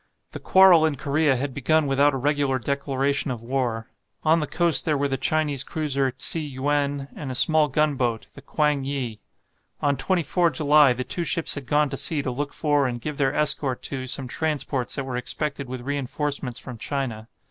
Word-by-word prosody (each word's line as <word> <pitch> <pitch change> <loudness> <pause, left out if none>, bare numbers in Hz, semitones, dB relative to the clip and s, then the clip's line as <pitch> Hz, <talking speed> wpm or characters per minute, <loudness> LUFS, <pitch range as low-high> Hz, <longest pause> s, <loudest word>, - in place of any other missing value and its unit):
The - - -7
quarrel 190 -4 +6
in 155 -2 +1
Korea 145 +1 +1
had 135 +1 -3
begun 155 +4 +1
without 140 +1 +2
a - - -1
regular 140 0 0
declaration 140 +1 -1
of 120 -3 -5
war. 120 -3 -2 0.4
On 160 +1 +3
the 150 - -3
coast 170 +1 +4
there 155 -2 0
were 140 +1 0
the 135 - -2
Chinese 145 0 0
cruiser, 140 -4 -1
"Tsi 130 +5 +2
yuen," 140 0 -2
and 145 - -6
a 130 - -4
small 155 +3 +4
gunboat, 130 -5 0
the - - -13
"Kwang 150 -3 0
yi." 130 -6 -4 0.6
On 145 -1 +1
24 175 +1 +1
July 150 -3 +4
the 125 +1 -4
two 175 - -3
ships 165 0 +1
had 140 -3 -6
gone 150 +1 +2
to 135 - -4
sea 150 -1 +2
to 130 - -2
look 145 +3 -4
for, 145 -3 +1
and 120 -1 -4
give 150 +4 -6
their 135 0 +1
escort 140 -3 +1
to, 130 -2 -5
some 130 +1 -3
transports 145 -3 -2
that 140 - -3
were 130 -2 -4
expected 140 +2 -2
with 130 -1 -6
reinforcements 140 -1 -3
from 125 -3 -8
China. 120 -5 -4
140 Hz, 190 wpm, -24 LUFS, 130-150 Hz, 0.6 s, quarrel